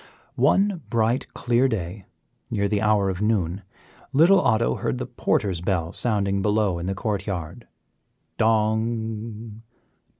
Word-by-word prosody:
One 195 -3 +2
bright, 115 +2 0
clear 120 +2 +2
day, 95 -4 -4 0.4
near 100 -3 0
the 105 -1 0
hour 105 -2 +2
of 95 +1 -6
noon, 100 -4 0 0.5
little 170 +7 +5
Otto 85 - +2
heard 65 - -2
the - - -3
porter's 90 -4 -1
bell 85 -3 -1
sounding 100 -4 0
below 105 -3 +1
in 85 - -4
the 95 - -2
court 100 0 -3
yard 90 +3 -5 0.7
dong! 110 0 -1
105 Hz, 130 wpm, -24 LUFS, 95-115 Hz, 0.7 s, little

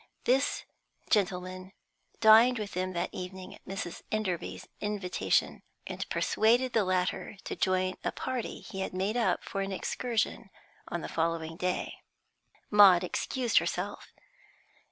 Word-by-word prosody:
This 265 +3 +1 0.5
gentleman 185 -2 0 0.5
dined 230 +3 +7
with 210 -3 -4
them 185 +1 -2
that 170 - -2
evening 185 +1 -7
at - - -16
Mrs. 190 -2 -5
Enderby's 180 - -2
invitation, 205 -3 0 0.2
and - - -5
persuaded 240 +4 +2
the 220 - +3
latter 185 +2 -1
to - - -4
join 185 0 +1
a - - 0
party 255 -3 -4
he 195 -4 -8
had 190 -1 -3
made 195 +4 -1
up 240 -2 +1
for 195 - -3
an 195 0 -3
excursion 230 +4 -2 0.4
on - - -3
the - - -5
following 165 0 -1
day. 180 +1 -2 0.7
Maud 195 -4 +8
excused 240 +6 +1
herself. - - -4
190 Hz, 135 wpm, -30 LUFS, 185-220 Hz, 0.7 s, Maud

